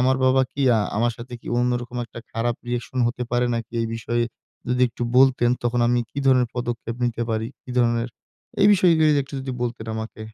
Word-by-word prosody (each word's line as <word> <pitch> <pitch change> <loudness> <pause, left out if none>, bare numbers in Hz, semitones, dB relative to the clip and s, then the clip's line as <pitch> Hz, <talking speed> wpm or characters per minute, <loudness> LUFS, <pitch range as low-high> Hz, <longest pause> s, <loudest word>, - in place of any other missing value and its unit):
আমার 130 +1 +3
বাবা 130 +1 +4
কি 140 - -5 0.2
আ - - +3 0.2
আমার 120 +1 +2
সাথে 125 +1 -10
কি - - -18
অন্যরকম 120 0 -1
একটা 115 - -11
খারাপ 120 +1 0
রিঅ্যাকশন 120 +1 -3
হতে 125 0 -4
পারে 120 0 +2
নাকি? 115 -1 -5
এই 115 - -1
বিষয়ে 120 +1 -1 0.4
যদি 125 0 0
একটু 120 - -7
বলতেন। 130 -2 +5
তখন 120 0 +1
আমি 120 0 +3
কি - - -6
ধরনের 125 -3 +4
পদক্ষেপ 120 -1 -3
নিতে 120 -1 -1
পারি? 110 0 -1 0.2
কি 125 - -10
ধরণের? 120 0 +2 0.5
এই 200 - +7
বিষয় 185 -2 +4
গুলি 155 -1 +5
যদি 145 -1 +3
একটু 140 - -11
যদি 130 0 -4
বলতেন 115 -2 -3
আমাকে। 110 0 -6
120 Hz, 210 wpm, -23 LUFS, 115-130 Hz, 0.5 s, এই